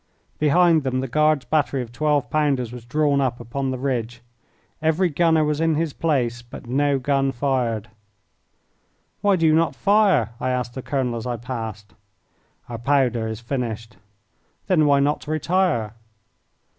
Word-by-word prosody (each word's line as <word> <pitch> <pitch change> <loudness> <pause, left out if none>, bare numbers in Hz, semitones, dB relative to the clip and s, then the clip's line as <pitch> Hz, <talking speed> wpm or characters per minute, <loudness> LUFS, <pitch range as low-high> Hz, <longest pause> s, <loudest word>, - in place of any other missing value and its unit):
Behind 165 +2 +4
them 130 -2 -1
the 130 - -2
Guard's 150 +1 +2
battery 145 -4 0
of 115 - -12
twelve 150 +2 0
pounders 140 -6 0
was 120 -1 -10
drawn 145 +2 +1
up 130 -2 -1
upon 130 +3 -3
the 130 - -2
ridge. 120 -3 -3 0.6
Every 160 +3 +2
gunner 160 0 +2
was 150 0 -1
in 165 -1 +2
his 160 -1 -1
place, 125 -7 -1
but 120 +2 -11
no 140 +3 +1
gun 135 +1 0
fired. 120 -5 -1 1.3
"Why 200 -1 +3
do 165 -3 +1
you 155 - +5
not 160 -3 +2
fire?" 200 - +3
I 130 - -1
asked 125 -1 -2
the 130 - -6
colonel 130 -3 -2
as 115 - -5
I 120 -1 -2
passed. 110 -4 -6 0.7
"Our 115 -1 -6
powder 125 -3 +1
is 110 0 -5
finished." 115 -3 -4 0.7
"Then 165 -6 +3
why 140 -1 +4
not 145 +1 0
retire?" 155 - 0
135 Hz, 155 wpm, -22 LUFS, 120-155 Hz, 1.3 s, you